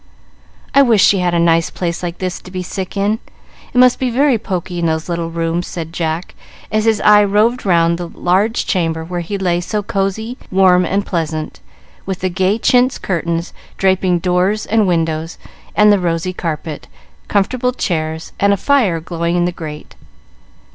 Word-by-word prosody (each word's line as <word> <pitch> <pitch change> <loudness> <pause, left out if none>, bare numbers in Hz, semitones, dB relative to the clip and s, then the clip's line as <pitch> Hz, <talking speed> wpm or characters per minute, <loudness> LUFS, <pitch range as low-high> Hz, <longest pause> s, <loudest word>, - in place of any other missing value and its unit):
"I 280 - +6
wish 230 -7 +4
she 200 - +4
had 175 -1 +1
a - - +2
nice 165 -1 +3
place 170 -2 -3
like 175 -1 -4
this 185 -1 -3
to - - -12
be 185 0 -4
sick 190 +2 -5
in. 205 +3 +1 0.5
It - - -4
must 250 0 +5
be 255 - 0
very 260 0 +2
poky 180 -4 -4
in 170 - +1
those 160 0 -1
little 170 -1 -2
rooms," 165 +1 -2
said 165 -1 -6
Jack, 165 +1 -3 0.4
as 215 0 +1
his 220 -2 +3
eye 210 0 +6
roved 210 +3 +1
round 170 -1 +3
the 175 - -4
large 200 +8 0
chamber 165 -4 -1
where 175 +1 -4
he 175 +4 -4
lay 175 -2 0
so 210 +3 -3
cosey, 220 +4 -2
warm, 185 -1 +4
and 195 +4 -1
pleasant, 160 -3 -3 0.5
with 190 -2 -4
the 185 - 0
gay 190 +3 +1
chintz 250 +2 +3
curtains 170 -1 -2 0.2
draping 190 -2 +2
doors 180 +4 0
and 215 -1 +2
windows, 165 -1 -1 0.4
the 210 -1 +6
rosy 175 +1 -1
carpet, 160 -3 -5 0.4
comfortable 245 +5 +1
chairs, 160 -8 -3
and 200 0 +4
a - - 0
fire 220 -8 +2
glowing 170 +1 -2
in 175 0 +2
the 175 - 0
grate. 155 -3 -8
180 Hz, 175 wpm, -17 LUFS, 170-205 Hz, 0.5 s, I